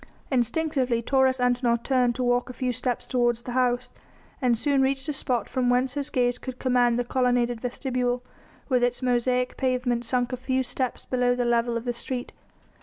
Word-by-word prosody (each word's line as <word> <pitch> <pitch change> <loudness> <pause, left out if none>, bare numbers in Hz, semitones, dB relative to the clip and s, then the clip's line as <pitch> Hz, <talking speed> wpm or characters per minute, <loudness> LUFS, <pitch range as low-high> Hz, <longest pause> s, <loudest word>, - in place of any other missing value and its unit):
Instinctively 255 -2 0
Taurus 265 0 +3
Antinor 245 -1 +2
turned 250 -3 +2
to 255 - -2
walk 245 0 +1
a - - -6
few 250 0 -2
steps 250 0 -2
toward 240 -1 +2
the 240 +2 -8
house, 250 0 +1 0.5
and 245 -3 +3
soon 280 +2 +2
reached 270 +2 0
a 300 - -1
spot 250 -3 -1
from 250 -1 0
whence 250 +1 +2
his 285 0 -2
gaze 245 -2 +1
could 260 -1 -7
command 245 -2 +2
the 245 - +1
colonnaded 245 -2 +1
vestibule, 250 -1 -2 0.4
with 250 -3 +2
its 245 +1 0
mosaic 250 0 +1
pavement 250 -2 0
sunk 245 +1 0
a - - -2
few 260 +1 0
steps 255 0 -3
below 245 -1 +1
the 245 -1 0
level 235 0 +1
of 230 - -6
the 245 - -1
street. 245 +1 -5
250 Hz, 185 wpm, -26 LUFS, 245-255 Hz, 0.5 s, Taurus